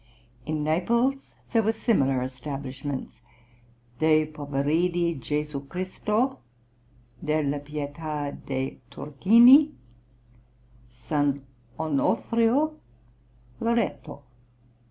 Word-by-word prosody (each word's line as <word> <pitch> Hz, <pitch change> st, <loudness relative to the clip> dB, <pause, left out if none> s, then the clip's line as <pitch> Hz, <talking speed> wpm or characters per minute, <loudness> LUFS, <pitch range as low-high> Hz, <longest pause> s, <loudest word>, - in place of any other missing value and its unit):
In 155 Hz, -1 st, -1 dB
Naples 235 Hz, -, 0 dB, 0.2 s
were 225 Hz, -2 st, +3 dB
similar 135 Hz, -, +1 dB
establishments, 135 Hz, 0 st, -6 dB, 0.8 s
De 155 Hz, 0 st, +4 dB
Poveridi 155 Hz, +4 st, 0 dB
Gesù 150 Hz, +1 st, -3 dB
Christo; 210 Hz, -, -1 dB, 0.8 s
Della 150 Hz, -2 st, 0 dB
Pietà 145 Hz, 0 st, -4 dB, 0.2 s
de' 135 Hz, -1 st, -3 dB
Turchini; 235 Hz, -, +6 dB, 1.1 s
S. 120 Hz, 0 st, -11 dB, 0.6 s
Onofrio; 230 Hz, -, +1 dB, 0.8 s
Loretto. 230 Hz, -11 st, -1 dB
155 Hz, 65 wpm, -26 LUFS, 140-220 Hz, 1.1 s, Turchini